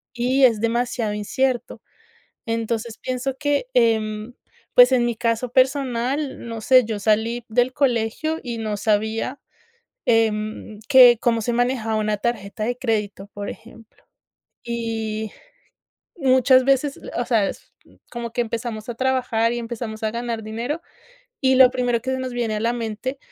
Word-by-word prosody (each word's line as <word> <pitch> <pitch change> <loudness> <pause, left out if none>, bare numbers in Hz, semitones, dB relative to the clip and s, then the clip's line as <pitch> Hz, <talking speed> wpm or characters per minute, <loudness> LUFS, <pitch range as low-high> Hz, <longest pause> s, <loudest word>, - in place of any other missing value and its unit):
Y 255 +3 +1
es 230 -5 +5
demasiado 230 -1 -1
incierto. 245 +4 -2 0.7
Entonces, 230 0 -3
pienso 255 +1 -3
que, 290 -3 0
em, 220 -1 +1 0.4
pues, 250 +1 +8
en 245 -2 +3
mi 240 -1 0
caso 230 +1 -1
personal, 265 +1 0
no 230 -1 -5
sé, 255 +2 +5
yo 215 -2 -3
salí 225 +3 0
del 245 +3 +1
colegio 270 +4 0
y 235 -2 -5
no 215 -2 -2
sabía, 220 +5 -1 0.7
em, 215 -2 0
que 250 -4 +8
cómo 230 -1 +2
se 240 +2 -1
manejaba 240 -2 0
una 215 -1 0
tarjeta 215 -2 -3
de 245 +1 -2
crédito, 210 -5 -2
por 205 0 -5
ejemplo. 225 -1 -14 0.6
Y, 225 -2 -3 0.9
muchas 260 -2 +4
veces, 275 +1 +1 0.2
o 240 - 0
sea, 225 -5 +2
es - - -11 0.4
como 235 -1 -6
que 245 - -5
empezamos 230 -1 -3
a 240 - -5
trabajar 245 -3 +1
y 240 - -2
empezamos 230 -2 -6
a 215 - 0
ganar 235 -1 -4
dinero, 240 +9 -4 0.6
y 260 -1 +4
lo 255 -1 +8
primero 245 -2 0
que 260 - -4
se 260 - 0
nos 255 -1 -4
viene 235 -3 -1
a - - -3
la 230 +2 +1
mente, 240 +3 -4
235 Hz, 150 wpm, -22 LUFS, 220-255 Hz, 0.9 s, pues